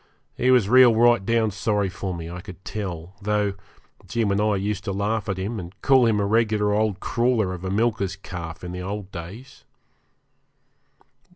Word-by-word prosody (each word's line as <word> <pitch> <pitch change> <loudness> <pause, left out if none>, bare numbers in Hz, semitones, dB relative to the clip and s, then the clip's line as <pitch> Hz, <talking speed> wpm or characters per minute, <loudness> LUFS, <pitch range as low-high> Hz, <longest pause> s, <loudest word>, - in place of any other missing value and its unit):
He 125 - +1
was 125 -6 +5
real 125 0 +7
rightdown 115 -1 +3
sorry 100 +1 0
for 95 +1 -5
me, 85 -2 -5
I 90 +1 -7
could 95 -1 -12
tell, 90 -4 -5
though 105 0 0 0.5
Jim 115 -4 0
and 100 +1 +1
I 105 -1 +2
used 100 0 -2
to - - -2
laugh 105 +2 -1
at 95 - -1
him, 105 +4 -3
and 90 +2 -10
call 130 -3 +5
him 110 -2 +2
a 100 - +1
regular 105 -1 +2
old 105 -2 0
crawler 115 -5 +1
of 90 0 -8
a 95 - -3
milker's 100 -2 0
calf 85 -4 -8
in 90 - -5
the 90 0 -5
old 100 +1 -5
days. 95 +10 -10
100 Hz, 180 wpm, -24 LUFS, 95-110 Hz, 0.5 s, real